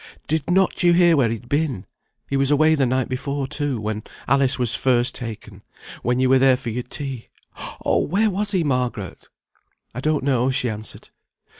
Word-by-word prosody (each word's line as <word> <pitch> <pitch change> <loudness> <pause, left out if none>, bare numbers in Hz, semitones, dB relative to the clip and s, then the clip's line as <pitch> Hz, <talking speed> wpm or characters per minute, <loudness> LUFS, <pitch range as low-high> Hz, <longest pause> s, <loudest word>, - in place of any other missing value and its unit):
Did 160 0 -1
not 190 +1 +2
you 175 -1 +5
hear 175 -1 +5
where 130 -6 +2
he'd 115 +1 -5
been? 140 -8 -1 0.4
He 140 - -3
was 135 0 +3
away 155 +2 +4
the 140 -4 +2
night 130 +1 0
before, 140 +2 -3
too, 145 -3 -2
when 105 0 -3 0.3
Alice 135 0 +3
was 125 -3 +2
first 125 0 +2
taken; 115 -4 -7 0.4
when 125 +1 0
you 130 - +3
were 130 +1 +4
there 130 -1 +4
for 130 -3 -5
your 125 +3 -3
tea. 130 -1 -6 0.6
Oh! - - +2
where 210 +6 +1
was 205 +2 -2
he, 190 -4 +1
Margaret?" 125 -8 -3 0.6
"I 125 - -5
don't 150 -1 0
know," 130 -2 +1
she 125 -2 -1
answered. 110 0 -9
135 Hz, 185 wpm, -22 LUFS, 125-150 Hz, 0.6 s, you